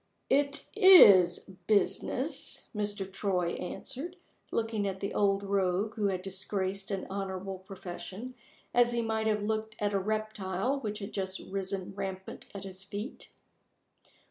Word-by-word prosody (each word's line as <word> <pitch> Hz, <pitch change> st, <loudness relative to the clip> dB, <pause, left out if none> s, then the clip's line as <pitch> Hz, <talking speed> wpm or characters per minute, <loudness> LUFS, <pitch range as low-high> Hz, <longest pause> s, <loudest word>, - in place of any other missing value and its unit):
"It 280 Hz, +1 st, +2 dB
is 355 Hz, -, +9 dB, 0.3 s
business," 210 Hz, -2 st, +1 dB
Mr. 205 Hz, -1 st, -1 dB
Troy 185 Hz, -4 st, 0 dB
answered, 275 Hz, -, -5 dB, 0.4 s
looking 220 Hz, -3 st, 0 dB
at 190 Hz, -1 st, -3 dB
the 200 Hz, -, -3 dB
old 200 Hz, -1 st, +2 dB
rogue 195 Hz, +1 st, +1 dB
who 210 Hz, -2 st, 0 dB
had 185 Hz, -2 st, -2 dB
disgraced 195 Hz, 0 st, -2 dB
an 195 Hz, -2 st, -2 dB
honorable 190 Hz, -1 st, -4 dB
profession, 190 Hz, +5 st, -8 dB, 0.4 s
as 240 Hz, 0 st, +4 dB
he 235 Hz, -1 st, +1 dB
might 220 Hz, -1 st, 0 dB
have 210 Hz, -1 st, +1 dB
looked 220 Hz, 0 st, -2 dB
at 205 Hz, -1 st, 0 dB
a 200 Hz, -, +2 dB
reptile 215 Hz, +3 st, -1 dB
which 210 Hz, -5 st, -3 dB
had 205 Hz, 0 st, -7 dB
just 190 Hz, -1 st, -2 dB
risen 195 Hz, -1 st, -4 dB
rampant 190 Hz, -1 st, -6 dB
at 200 Hz, -, -6 dB
his 190 Hz, -1 st, -6 dB
feet. 205 Hz, +6 st, -6 dB
200 Hz, 140 wpm, -30 LUFS, 190-220 Hz, 0.4 s, is